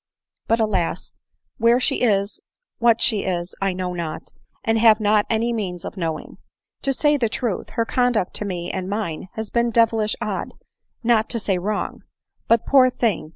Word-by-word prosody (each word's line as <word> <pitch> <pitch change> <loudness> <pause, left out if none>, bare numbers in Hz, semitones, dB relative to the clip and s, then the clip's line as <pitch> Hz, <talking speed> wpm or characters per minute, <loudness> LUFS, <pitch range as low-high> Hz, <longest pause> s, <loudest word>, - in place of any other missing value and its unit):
But, 230 - +2
alas! 185 -6 -1 0.5
where 235 +2 +4
she - - 0
is, 200 -4 +1 0.4
what 235 -1 +4
she 215 -4 +2
is, 175 -1 -2
I 195 0 +1
know 180 0 -3
not, 170 -1 -5 0.3
and 225 0 +1
have 220 -1 +6
not 210 0 +2
any 230 +1 +1
means 185 -6 -4
of - - -6
knowing. 165 -4 -4 0.4
To 275 - +1
say 295 +2 +2
the 235 -5 0
truth, 225 -3 -3
her 230 - 0
conduct 245 -6 +1
to 210 - -2
me 175 -3 -4
and 190 -1 -4
mine 200 -5 -3
has 220 -1 -5
been 235 0 +2
devilish 225 -2 +2
odd, 215 -4 -4 0.5
not 225 -2 +3
to 240 - +1
say 195 -4 0
wrong. 205 +3 -3 0.5
But, 230 -1 +3
poor 260 -2 +6
thing 225 -10 -1
215 Hz, 175 wpm, -22 LUFS, 185-235 Hz, 0.5 s, have